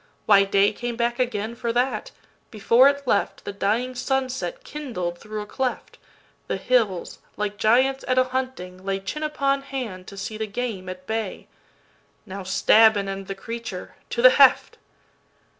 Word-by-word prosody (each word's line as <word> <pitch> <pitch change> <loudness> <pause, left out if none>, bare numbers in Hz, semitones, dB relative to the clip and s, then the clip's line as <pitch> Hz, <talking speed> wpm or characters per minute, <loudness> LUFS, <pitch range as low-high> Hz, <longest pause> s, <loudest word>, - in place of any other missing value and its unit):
—Why, 200 -2 +6
dayCame 205 +4 +1
back 240 +1 0
again 225 -3 -1
for 235 0 -3
that! 250 +2 0 0.4
before 235 +5 +5
it 280 0 -3
left, 205 -5 0
The - - -5
dying 225 +6 0
sunset 265 - -2
kindled 230 - -5
through 215 0 -6
a - - -6
cleft:The 255 +4 -6
hills, 225 -8 0 0.2
like 210 0 -3
giants 260 +6 +3
at 255 0 +1
a 255 - +6
hunting, 255 -9 -5
lay, 195 0 -1
Chin 195 +11 -5
upon 275 -2 0
hand, 245 -10 -6
to 200 - -10
see 215 +2 -5
the 220 - -2
game 210 -4 -4
at 185 0 -8
bay,—"Now 210 -2 -8
stab 210 +3 +5
and 200 -1 -2
end 195 0 -5
the 195 - -4
creature—to 230 +1 -6
the 255 - +10
heft!" 275 0 +4
225 Hz, 150 wpm, -24 LUFS, 195-255 Hz, 0.4 s, the